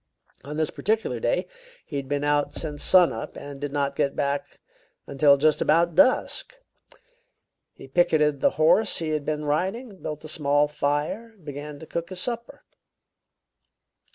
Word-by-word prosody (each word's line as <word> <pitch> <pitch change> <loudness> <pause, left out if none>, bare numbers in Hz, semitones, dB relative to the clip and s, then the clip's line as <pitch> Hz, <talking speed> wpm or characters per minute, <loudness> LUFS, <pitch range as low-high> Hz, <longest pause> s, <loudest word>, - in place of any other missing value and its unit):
On 150 +3 -6
this 155 -1 0
particular 220 +1 -1
day - - 0 0.4
he 145 - -5
had 135 -1 -5
been 145 0 -1
out 145 0 +1
since 150 -3 -4
sun 180 -2 +5
up 115 +1 -7
and 140 -1 -9
did 145 -1 -3
not 140 -1 -1
get 140 - 0
back 140 0 -2 0.5
until 140 0 +4
just 155 +1 +2
about 170 +2 +3
dusk. 255 - +2 1.2
He - - -12
picketed 150 -2 +2
the - - +5
horse 170 +7 +4
he 165 -2 -3
had 155 -2 -2
been 150 -1 -2
riding, 190 - -1
and 190 - -17
built 155 0 -6
a - - -6
small 145 -1 +2
fire, 150 +10 -2
and 185 -7 -24
began 145 0 -7
to 160 - -11
cook 170 +1 -4
his 185 -1 -7
supper. 235 +3 -5
150 Hz, 165 wpm, -25 LUFS, 145-170 Hz, 1.2 s, sun